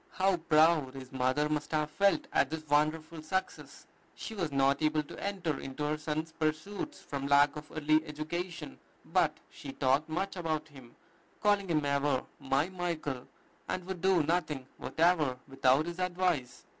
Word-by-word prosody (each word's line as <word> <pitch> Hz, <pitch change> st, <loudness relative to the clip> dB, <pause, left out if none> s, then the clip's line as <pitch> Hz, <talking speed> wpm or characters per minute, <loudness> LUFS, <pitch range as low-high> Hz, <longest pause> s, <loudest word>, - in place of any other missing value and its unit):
How 190 Hz, 0 st, +2 dB
proud 155 Hz, -4 st, +3 dB
his 130 Hz, -1 st, -9 dB
mother 130 Hz, +3 st, +1 dB
must 150 Hz, 0 st, -2 dB
have 150 Hz, 0 st, 0 dB
felt 200 Hz, -, +3 dB
at 135 Hz, -, +3 dB
this 160 Hz, 0 st, -5 dB
wonderful 155 Hz, +2 st, +1 dB
success! 190 Hz, +5 st, -4 dB, 0.3 s
She 225 Hz, -, -6 dB
was 175 Hz, -8 st, -2 dB
not 140 Hz, +1 st, +2 dB
able 155 Hz, 0 st, +2 dB
to -, -, -9 dB
enter 190 Hz, -6 st, -2 dB
into 135 Hz, +2 st, -5 dB
her 150 Hz, +1 st, 0 dB
son's 155 Hz, +1 st, -3 dB
pursuits 160 Hz, -, -3 dB
from 140 Hz, -1 st, -4 dB
lack 145 Hz, +1 st, +5 dB
of 150 Hz, 0 st, -9 dB
early 155 Hz, 0 st, +2 dB
education; 160 Hz, +4 st, -5 dB, 0.3 s
but -, -, +2 dB
she 135 Hz, -2 st, -8 dB
talked 140 Hz, +4 st, +2 dB
much 195 Hz, +5 st, -2 dB
about 155 Hz, -3 st, -2 dB
him, 130 Hz, -4 st, -14 dB, 0.4 s
calling 205 Hz, -3 st, +2 dB
him 155 Hz, -3 st, +1 dB
ever, 140 Hz, -1 st, +1 dB, 0.2 s
"my 135 Hz, +4 st, +1 dB
Michael"; 165 Hz, -8 st, -3 dB, 0.4 s
and 185 Hz, -1 st, -2 dB
would 185 Hz, -2 st, -5 dB
do 190 Hz, -3 st, +4 dB
nothing 155 Hz, -4 st, -1 dB
whatever 160 Hz, -6 st, +2 dB
without 135 Hz, +2 st, +3 dB
his 175 Hz, +1 st, -6 dB
advice. 175 Hz, -9 st, 0 dB
155 Hz, 160 wpm, -31 LUFS, 145-175 Hz, 0.4 s, lack